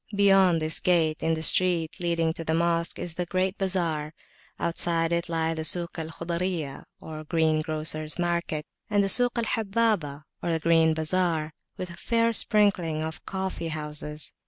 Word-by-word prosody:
Beyond 195 Hz, -4 st, +4 dB
this 155 Hz, 0 st, 0 dB
gate, 165 Hz, -4 st, +1 dB
in 160 Hz, 0 st, +1 dB
the 160 Hz, -, -5 dB
street 170 Hz, -2 st, +2 dB
leading 170 Hz, -2 st, 0 dB
to 165 Hz, -, -6 dB
the 160 Hz, 0 st, -1 dB
Mosque, 170 Hz, 0 st, 0 dB
is 170 Hz, -, -5 dB
the 175 Hz, +1 st, -4 dB
great 185 Hz, +3 st, -1 dB
bazar. 165 Hz, -5 st, -1 dB, 0.4 s
Outside 165 Hz, 0 st, 0 dB
it 170 Hz, 0 st, -1 dB
lie 165 Hz, -1 st, 0 dB
the 160 Hz, -1 st, -4 dB
Suk 170 Hz, +1 st, 0 dB
al 160 Hz, -, -4 dB
Khuzayriyah, 170 Hz, -3 st, -4 dB
or 155 Hz, -1 st, -8 dB
greengrocers' 155 Hz, -1 st, +1 dB
market, 170 Hz, -3 st, -2 dB, 0.2 s
and 205 Hz, -1 st, +2 dB
the 195 Hz, -, 0 dB
Suk 245 Hz, +4 st, +5 dB
al 235 Hz, -, +1 dB
Habbabah, 210 Hz, -9 st, -1 dB, 0.2 s
or 170 Hz, -, -2 dB
the 165 Hz, -, 0 dB
grain 160 Hz, 0 st, +3 dB
bazar, 160 Hz, -1 st, 0 dB, 0.2 s
with 180 Hz, -1 st, -5 dB
a -, -, -10 dB
fair 230 Hz, +4 st, +1 dB
sprinkling 185 Hz, -8 st, +2 dB
of 160 Hz, 0 st, -6 dB
coffee 190 Hz, -3 st, -4 dB
houses. 150 Hz, -1 st, -5 dB
165 Hz, 165 wpm, -26 LUFS, 160-185 Hz, 0.4 s, Suk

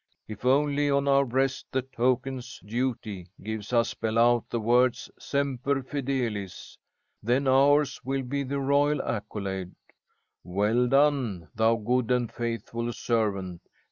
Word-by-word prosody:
If 110 Hz, +2 st, -9 dB
only 145 Hz, +2 st, +3 dB
on 140 Hz, 0 st, +1 dB
our 140 Hz, 0 st, +5 dB
breasts 135 Hz, +2 st, 0 dB
the 130 Hz, -1 st, 0 dB
tokens 130 Hz, 0 st, -2 dB
Duty 110 Hz, -5 st, -3 dB, 0.2 s
gives 110 Hz, 0 st, -5 dB
us 120 Hz, -1 st, +3 dB
spell 110 Hz, 0 st, -2 dB
out 120 Hz, 0 st, +3 dB
the 120 Hz, -, -1 dB
words, 120 Hz, +2 st, +2 dB
'semper 140 Hz, -1 st, -1 dB
fidelis,' 125 Hz, -8 st, -3 dB, 0.5 s
then 125 Hz, +5 st, +1 dB
ours 140 Hz, +1 st, +4 dB
will 135 Hz, 0 st, -2 dB
be 140 Hz, +3 st, -2 dB
the 140 Hz, +1 st, -2 dB
royal 140 Hz, +2 st, +2 dB
accolade: 100 Hz, -4 st, -4 dB, 0.7 s
'Well 105 Hz, +7 st, +1 dB
done, 130 Hz, -, +2 dB
thou 110 Hz, +1 st, +3 dB
good 115 Hz, +2 st, 0 dB
and 125 Hz, -2 st, +1 dB
faithful 115 Hz, 0 st, -3 dB
servant. 100 Hz, -7 st, -1 dB
125 Hz, 130 wpm, -27 LUFS, 110-135 Hz, 0.7 s, our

